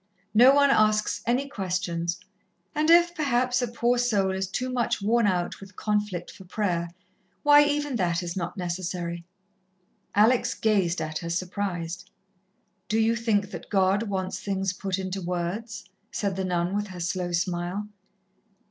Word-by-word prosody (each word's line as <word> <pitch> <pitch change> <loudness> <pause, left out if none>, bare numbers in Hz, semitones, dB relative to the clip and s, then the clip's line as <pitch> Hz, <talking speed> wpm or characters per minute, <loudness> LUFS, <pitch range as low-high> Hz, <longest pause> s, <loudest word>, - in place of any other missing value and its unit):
No 245 +5 +8
one 280 0 +5
asks 215 -2 +2
any 255 +4 +1
questions, 180 -6 -2 0.5
and 310 0 +1
if, 345 +1 +6
perhaps, 255 -5 +1
a 245 - 0
poor 240 +1 +1
soul 205 -6 +2
is 190 0 -2
too 250 +7 -3
much 245 -2 0
worn 225 +2 +2
out 180 -3 -1
with 195 -1 -13
conflict 210 -4 -2
for 190 - -13
prayer, 175 -3 -1 0.5
why, 290 0 +8
even 290 -3 -1
that 175 -2 0
is 170 -1 -4
not 185 +2 -4
necessary." 175 -1 -4 0.9
Alex 225 +4 +4
gazed 190 -6 +1
at 155 0 -4
her, 170 - -6
surprised. 175 -1 -3 0.8
"Do 215 - +1
you 225 +1 +3
think 210 -3 0
that - - -8
God 195 0 +3
wants 190 -1 -2
things 195 -1 -1
put 190 0 -3
into 190 0 -4
words?" 180 +5 -4 0.3
said 200 -3 -2
the 190 0 -2
nun 175 +1 0
with 205 0 -1
her 185 -2 -9
slow 175 +1 -2
smile. 175 +3 -2
195 Hz, 155 wpm, -26 LUFS, 180-230 Hz, 0.9 s, No